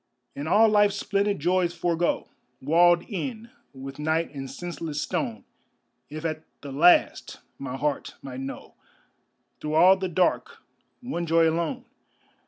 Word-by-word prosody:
And 145 Hz, +2 st, -5 dB
all 215 Hz, +6 st, +5 dB
life's 205 Hz, -2 st, +3 dB
splendid 200 Hz, 0 st, 0 dB
joys 175 Hz, +2 st, +1 dB
forego, 175 Hz, 0 st, 0 dB, 0.3 s
Walled 170 Hz, +4 st, +4 dB
in 230 Hz, +3 st, -6 dB, 0.2 s
with 135 Hz, +1 st, -9 dB
night 160 Hz, +1 st, -1 dB
and 135 Hz, -2 st, -6 dB
senseless 165 Hz, -3 st, -5 dB
stone, 120 Hz, -, -3 dB, 0.6 s
If 155 Hz, +2 st, -7 dB
at 155 Hz, -1 st, -3 dB, 0.2 s
the 140 Hz, -, -8 dB
last 170 Hz, +6 st, +3 dB, 0.2 s
my 135 Hz, -1 st, -5 dB
heart 145 Hz, +1 st, -2 dB
might 130 Hz, -1 st, -7 dB
know 135 Hz, +1 st, -7 dB, 0.9 s
Through 150 Hz, 0 st, -3 dB
all 185 Hz, +4 st, +7 dB
the 190 Hz, -1 st, -3 dB
dark 180 Hz, +1 st, 0 dB, 0.4 s
one 210 Hz, -9 st, -4 dB
joy 165 Hz, 0 st, +4 dB
alone. 170 Hz, +10 st, -2 dB
165 Hz, 135 wpm, -26 LUFS, 150-185 Hz, 0.9 s, all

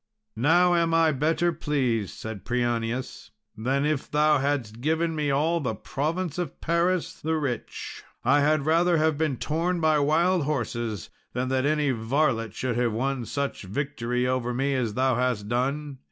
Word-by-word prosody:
"Now 175 Hz, +5 st, +5 dB
am 165 Hz, -1 st, +2 dB
I 165 Hz, -1 st, +4 dB
better 160 Hz, +4 st, +1 dB
pleased," 130 Hz, -, -1 dB
said 110 Hz, -4 st, -7 dB
Prianius, 120 Hz, +1 st, -2 dB, 0.3 s
"than 135 Hz, +6 st, 0 dB
if 150 Hz, -2 st, -1 dB
thou 150 Hz, 0 st, +3 dB
hadst 130 Hz, -5 st, -2 dB
given 160 Hz, +3 st, 0 dB
me 150 Hz, -2 st, 0 dB
all 155 Hz, +5 st, +2 dB
the 125 Hz, -8 st, -2 dB
province 160 Hz, -, -3 dB
of 170 Hz, -6 st, -4 dB
Paris 170 Hz, +2 st, +1 dB
the 160 Hz, +1 st, 0 dB
rich. 135 Hz, -7 st, -4 dB, 0.2 s
I 140 Hz, +4 st, +5 dB
had 145 Hz, 0 st, +2 dB
rather 170 Hz, +2 st, +3 dB
have 160 Hz, 0 st, +2 dB
been 150 Hz, -3 st, 0 dB
torn 170 Hz, +6 st, -1 dB
by 155 Hz, -2 st, +3 dB
wild 165 Hz, +3 st, +2 dB
horses 120 Hz, -, -3 dB, 0.2 s
than 125 Hz, +1 st, -1 dB
that 130 Hz, +1 st, +1 dB
any 150 Hz, -2 st, +2 dB
varlet 115 Hz, -2 st, 0 dB
should 125 Hz, -2 st, -2 dB
have 120 Hz, -2 st, +1 dB
won 130 Hz, +1 st, -1 dB
such 140 Hz, +2 st, -3 dB
victory 125 Hz, +3 st, -2 dB
over 125 Hz, -1 st, -1 dB
me 135 Hz, +2 st, 0 dB
as 120 Hz, -5 st, -1 dB
thou 130 Hz, +1 st, +2 dB
hast 125 Hz, -5 st, 0 dB
done. 135 Hz, +4 st, -2 dB
140 Hz, 165 wpm, -26 LUFS, 125-155 Hz, 0.3 s, Now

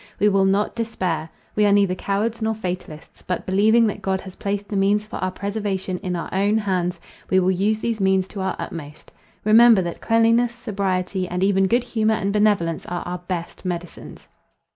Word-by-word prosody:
We 210 Hz, -, +4 dB
will 195 Hz, -1 st, +3 dB
not 195 Hz, +2 st, +1 dB
despair. 185 Hz, -8 st, -2 dB, 0.3 s
We 210 Hz, -, +3 dB
are -, -, +3 dB
neither 200 Hz, -2 st, +3 dB
cowards 210 Hz, +5 st, -2 dB
nor 220 Hz, 0 st, 0 dB
fatalists; 180 Hz, -6 st, -7 dB
but, 180 Hz, -, -3 dB
believing 215 Hz, +5 st, +4 dB
that 205 Hz, -1 st, -2 dB
God 190 Hz, 0 st, -1 dB
has 190 Hz, -1 st, -10 dB
placed 200 Hz, 0 st, -3 dB
the 205 Hz, -, -3 dB
means 200 Hz, +2 st, +2 dB
for 215 Hz, -, -7 dB
our 185 Hz, -, -1 dB
preservation 195 Hz, -2 st, -3 dB
in 180 Hz, -3 st, -3 dB
our 170 Hz, -, -4 dB
own 200 Hz, +3 st, +2 dB
hands, 180 Hz, -4 st, -1 dB, 0.3 s
we 190 Hz, -, +4 dB
will 185 Hz, 0 st, +2 dB
use 210 Hz, +4 st, 0 dB
those 230 Hz, -2 st, -1 dB
means 190 Hz, -1 st, +2 dB
to 200 Hz, -, -6 dB
our 190 Hz, -, -1 dB
utmost. 150 Hz, -2 st, -8 dB, 0.3 s
Remember 220 Hz, -2 st, +7 dB
that 170 Hz, -1 st, -5 dB
cleanliness, 230 Hz, +1 st, +3 dB
sobriety, 190 Hz, -5 st, -2 dB
and 180 Hz, +1 st, -2 dB
even 195 Hz, -1 st, +3 dB
good 235 Hz, +4 st, +2 dB
humour 220 Hz, -2 st, +1 dB
and 200 Hz, -2 st, -1 dB
benevolence, 205 Hz, -6 st, +2 dB
are 175 Hz, 0 st, -3 dB
our 180 Hz, 0 st, -4 dB
best 175 Hz, -2 st, -5 dB
medicines." 175 Hz, -2 st, -6 dB
195 Hz, 190 wpm, -22 LUFS, 185-215 Hz, 0.3 s, Remember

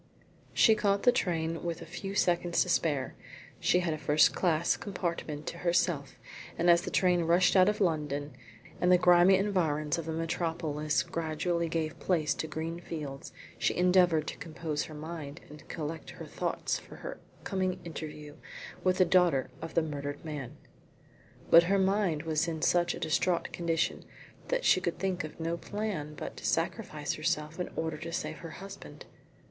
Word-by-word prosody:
She 220 Hz, -, +6 dB
caught 200 Hz, -2 st, +1 dB
the 245 Hz, -, +7 dB
train 165 Hz, -5 st, -1 dB
with 170 Hz, -2 st, -3 dB
a -, -, -8 dB
few 195 Hz, +4 st, -6 dB
seconds 175 Hz, -2 st, +2 dB
to 180 Hz, -, -7 dB
spare. 145 Hz, -6 st, +1 dB, 0.5 s
She 180 Hz, -, +3 dB
had 170 Hz, -3 st, 0 dB
a 155 Hz, -, -5 dB
first 150 Hz, +1 st, +4 dB
class 170 Hz, -2 st, +2 dB
compartment 170 Hz, -6 st, -4 dB
to 170 Hz, -, -5 dB
herself, 170 Hz, -5 st, 0 dB, 0.4 s
and 175 Hz, +1 st, +5 dB
as 170 Hz, 0 st, +5 dB
the -, -, -5 dB
train 180 Hz, -3 st, +2 dB
rushed 175 Hz, +4 st, +4 dB
out 185 Hz, +1 st, +6 dB
of 210 Hz, -, -1 dB
London, 150 Hz, -6 st, -1 dB, 0.5 s
and 180 Hz, -, +4 dB
the 180 Hz, -, +8 dB
grimy 180 Hz, +1 st, +6 dB
environs 170 Hz, -6 st, 0 dB
of 165 Hz, -, -6 dB
the -, -, -2 dB
metropolis 160 Hz, -2 st, -1 dB
gradually 165 Hz, +1 st, -1 dB
gave 160 Hz, -1 st, -2 dB
place 160 Hz, -5 st, +1 dB
to 160 Hz, -, -4 dB
green 165 Hz, +2 st, -4 dB
fields, 150 Hz, -5 st, -6 dB, 0.3 s
she -, -, +1 dB
endeavoured 180 Hz, -3 st, +4 dB
to -, -, -7 dB
compose 160 Hz, -5 st, -4 dB
her 155 Hz, -, -10 dB
mind 155 Hz, -1 st, -7 dB
and 150 Hz, -, -13 dB
collect 160 Hz, 0 st, -5 dB
her -, -, -9 dB
thoughts -, -, -2 dB
for -, -, -13 dB
her -, -, -7 dB, 0.2 s
coming 185 Hz, -1 st, -1 dB
interview 150 Hz, -2 st, -7 dB, 0.5 s
with 185 Hz, 0 st, +2 dB
the 185 Hz, -, +5 dB
daughter 175 Hz, -7 st, +3 dB
of 165 Hz, 0 st, -7 dB
the 165 Hz, -, +4 dB
murdered 145 Hz, -1 st, -5 dB
man. 145 Hz, -5 st, -6 dB, 0.9 s
But 170 Hz, +1 st, +9 dB
her 200 Hz, -, +4 dB
mind 190 Hz, -5 st, +1 dB
was 160 Hz, 0 st, 0 dB
in 160 Hz, -2 st, -3 dB
such 175 Hz, 0 st, +3 dB
a -, -, -7 dB
distraught 170 Hz, +3 st, 0 dB
condition 165 Hz, -1 st, -1 dB, 0.4 s
that -, -, -1 dB
she 185 Hz, -, +5 dB
could 175 Hz, -2 st, -2 dB
think 185 Hz, 0 st, -1 dB
of 155 Hz, +1 st, -8 dB
no 165 Hz, +1 st, -1 dB
plan 185 Hz, -7 st, -4 dB
but -, -, -7 dB
to -, -, -10 dB
sacrifice -, -, -1 dB
herself 150 Hz, +3 st, -2 dB
in 180 Hz, -, -2 dB
order 160 Hz, -1 st, -2 dB
to 170 Hz, -, -6 dB
save -, -, -3 dB
her 165 Hz, -, -8 dB
husband. 195 Hz, 0 st, -10 dB
165 Hz, 175 wpm, -30 LUFS, 155-180 Hz, 0.9 s, But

